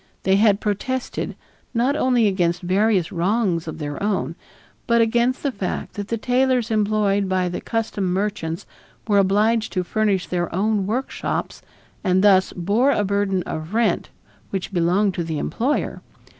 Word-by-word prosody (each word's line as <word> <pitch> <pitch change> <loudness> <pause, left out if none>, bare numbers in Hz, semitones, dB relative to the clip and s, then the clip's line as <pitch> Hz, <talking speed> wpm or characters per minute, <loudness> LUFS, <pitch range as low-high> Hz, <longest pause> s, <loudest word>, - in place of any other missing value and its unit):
They 190 +1 +3
had 205 -1 +4
protested, 245 +5 -3 0.4
not 250 +5 +2
only 250 -5 +3
against 180 -2 0
various 190 0 +2
wrongs 180 -1 0
of 160 - -5
their 145 -2 -5
own, 190 -8 -1 0.5
but 235 -1 +4
against 235 +3 +2
the 280 - +1
fact 200 -6 -4
that 205 -1 -5
the 230 - -1
tailors 250 0 +1
employed 205 -2 +1
by 185 -1 +1
the 175 - -4
custom 225 -4 -2
merchants 185 -4 -2 0.4
were 205 -2 +4
obliged 215 +3 +2
to 185 -1 0
furnish 200 -2 0
their 175 -1 -2
own 205 0 +1
workshops 250 +6 -3 0.4
and 185 +1 +2
thus 190 -2 +5
bore 205 +10 +1
a 210 - +2
burden 200 -2 0
of 160 +6 -5
rent 230 0 +1 0.4
which 195 0 -4
belonged 185 +3 +2
to 170 - -2
the 160 -2 -3
employer. 255 - -1
200 Hz, 155 wpm, -22 LUFS, 185-225 Hz, 0.5 s, thus